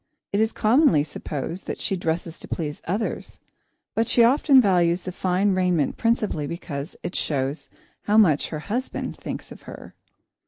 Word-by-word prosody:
It 205 - +2
is 220 +1 +2
commonly 220 - +4
supposed 150 +3 -6
that - - -3
she 195 - -1
dresses 165 -1 -3
to - - -8
please 150 -3 -4
others, 205 +6 -3 0.6
but 225 0 +1
she 235 - +5
often 270 +3 +5
values 180 -5 +3
fine 185 +2 0
raiment 180 -5 +1
principally 215 -10 0
because 150 -2 -6
it - - -4
shows 140 0 -2 0.3
how 210 +1 +1
much 165 -10 +4
her 155 -2 -5
husband 240 +9 -3
thinks - - -7
of - - -11
her. - - -10
180 Hz, 155 wpm, -24 LUFS, 160-215 Hz, 0.6 s, she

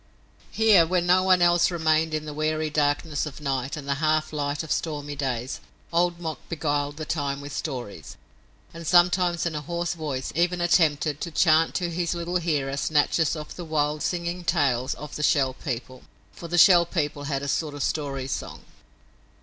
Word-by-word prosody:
Here, 215 -6 +5
when 175 +1 0
no 180 +1 +4
one 185 -1 +4
else 175 0 +4
remained 160 -2 +1
in 155 0 -3
the 150 - -6
weary 155 +1 -1
darkness 145 +1 0
of 150 - -9
night 135 +1 -2
and 140 -2 -8
the 140 - +1
half 155 0 +1
light 145 0 -2
of 160 - -7
stormy 145 -2 -2
days 130 -3 -3 0.3
Old 175 0 +1
Mok 160 -3 -4
beguiled 145 -3 -2
the 155 - -5
time 140 -3 -2
with 145 0 -8
stories, 120 - -6 0.6
and 165 -1 -8
sometimes 175 -1 +3
in 170 - -1
a 150 - -3
hoarse 170 +3 -3
voice 145 -6 -4
even 175 +2 +1
attempted 155 -4 +2
to 170 - -3
chant 160 0 +3
to 175 -2 -1
his 170 0 -1
little 170 +1 -1
hearer 145 -5 -1
snatches 155 +2 +1
of 150 -1 -8
the 175 - -6
wild 150 -2 -1
singing 175 0 -2
tales 135 -8 +1
of 150 0 -9
the - - -4
Shell 135 -3 +2
People, 130 -2 -5 0.3
for 170 - -9
the 175 +1 -2
Shell 175 -1 +7
People 145 -4 -2
had 140 -1 -2
a - - -3
sort 150 +1 -1
of 145 - -3
story 140 -3 -2
song. 135 - -5
155 Hz, 185 wpm, -25 LUFS, 145-170 Hz, 0.6 s, Shell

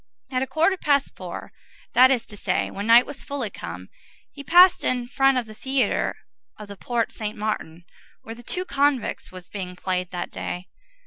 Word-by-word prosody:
At 255 0 0
a 265 - -1
quarter 330 +7 +2
past 285 -4 +1
four, - - -8 0.4
that 255 +1 +7
is 255 -4 +1
to 210 - -9
say, - - -1
when 200 +2 -5
night 235 +2 +7
was 285 -1 -9
fully 270 -7 -4
come, 90 +2 -8 0.4
he 280 - -10
passed 355 +4 +6
in 245 -1 0
front 270 +1 +3
of 245 - 0
the 215 - -11
theatre 265 0 0 0.4
of 210 -1 -10
the 200 - -8
Porte 235 +3 -2
Saint 215 0 -5
Martin, 175 -6 -4 0.4
where 225 - -7
The 235 - -12
Two 360 +9 -3
Convicts 280 -6 0
was 185 -1 -11
being 185 -3 -6
played 180 -1 -2
that 175 -1 -5
day. 180 +1 -5
235 Hz, 190 wpm, -24 LUFS, 200-270 Hz, 0.4 s, that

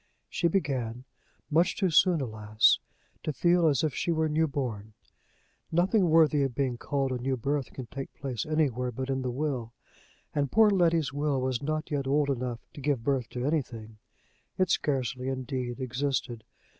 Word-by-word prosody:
She 170 - +1
began, 130 - -1 0.5
much 170 +5 +3
too 190 -4 +1
soon, 170 -1 +4
alas! 110 -3 +3 0.4
to - - -2
feel 175 +2 +3
as 145 -3 +2
if 155 -4 0
she 170 - -1
were 160 -1 +1
newborn; 135 -9 -1 0.8
nothing 180 +3 +3
worthy 155 -2 +5
of 135 -3 -1
being 135 -3 0
called 135 +2 -1
a 125 - -2
new 130 +1 -1
birth 140 +2 -2
can 130 - -7
take 135 +3 -7
place 130 -5 -3
anywhere 135 -5 0
but 130 +3 -4
in 135 0 -1
the 130 - -2
will, 125 -3 -3 0.6
and 140 -2 0
poor 220 -1 +6
Letty's 165 - +2
will 145 -1 0
was 130 -1 -1
not 155 +2 -2
yet 140 -2 -1
old 145 +1 +2
enough 125 -2 -3
to 145 - -9
give 135 -4 0
birth 130 -3 0
to 125 0 -4
anything; 115 -8 -3 0.6
it 185 -2 +2
scarcely, 130 -2 0
indeed, 130 -1 -3
existed. 130 -2 -2
135 Hz, 170 wpm, -28 LUFS, 125-155 Hz, 0.8 s, poor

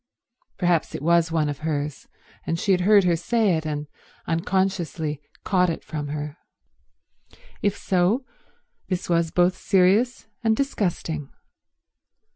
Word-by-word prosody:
Perhaps 175 -3 +1
it - - -5
was 170 0 +3
one 160 -2 +1
of 145 -1 -4
hers, 150 -2 -3 0.4
and 165 - 0
she 200 - +1
had 180 -1 +3
heard 200 +1 +6
her 175 -2 +3
say 205 +2 +2
it 160 0 -3
and 150 -1 -3 0.4
unconsciously 165 -3 -1 0.2
caught 180 -2 +2
it 165 - -4
from 150 -2 -5
her. 150 +1 -5 1.2
If 205 -1 +1
so, 195 +8 +1 0.6
this 180 -2 -3
was 170 -1 +2
both 180 +2 +3
serious 195 +7 +2 0.2
and 220 -1 +3
disgusting. 170 - -2
175 Hz, 130 wpm, -24 LUFS, 155-190 Hz, 1.2 s, heard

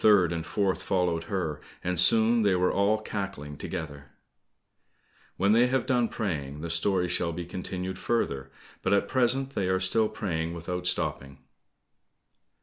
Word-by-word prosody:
The - - +4
third 95 -5 +5
and 85 -1 -3
fourth 95 +3 -1
followed 90 -3 0
her, 80 -7 -3 0.2
and 90 -1 -1
soon 115 +5 +5
they 100 -3 +3
were 90 0 +2
all 105 +2 +2
cackling 95 -10 -5
together. 70 -3 -6 1.3
When 100 +2 +3
they 120 +3 +5
have 130 0 0
done 125 -3 +2
praying, 75 - -4
the 85 0 -4
story 90 +2 +1
shall 85 -1 0
be 85 +1 -5
continued 90 +1 -5
further, 70 - -1 0.3
but 95 - +1
at 100 0 +2
present 130 +2 +1
they 100 -8 -1
are 95 0 +2
still 105 +4 +4
praying 85 -4 -3
without 90 +1 -3
stopping." 70 -6 -2
90 Hz, 155 wpm, -28 LUFS, 85-105 Hz, 1.3 s, third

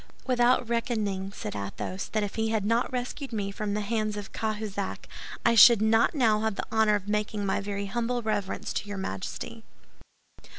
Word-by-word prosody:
"Without 245 -1 +3
reckoning," 215 -5 -1
said 105 - -6
Athos, 100 - -4
"that 215 -1 -1
if 205 - -3
he 220 0 0
had 220 -2 0
not 230 +3 +1
rescued 255 +2 -4
me 205 -3 -2
from 205 0 -3
the 210 - -1
hands 215 0 -1
of 205 -1 -7
Cahusac, 210 -3 -3 0.4
I 235 - +5
should 230 0 +9
not 225 +6 +3
now 225 -6 +3
have 220 -1 -1
the - - -3
honor 220 -1 +4
of 205 -1 -4
making 210 0 -1
my 195 - 0
very 200 0 -3
humble 235 +4 -1
reverence 205 -3 -2
to 205 - -3
your 205 - -4
Majesty." 95 - -5
215 Hz, 180 wpm, -28 LUFS, 200-230 Hz, 0.4 s, should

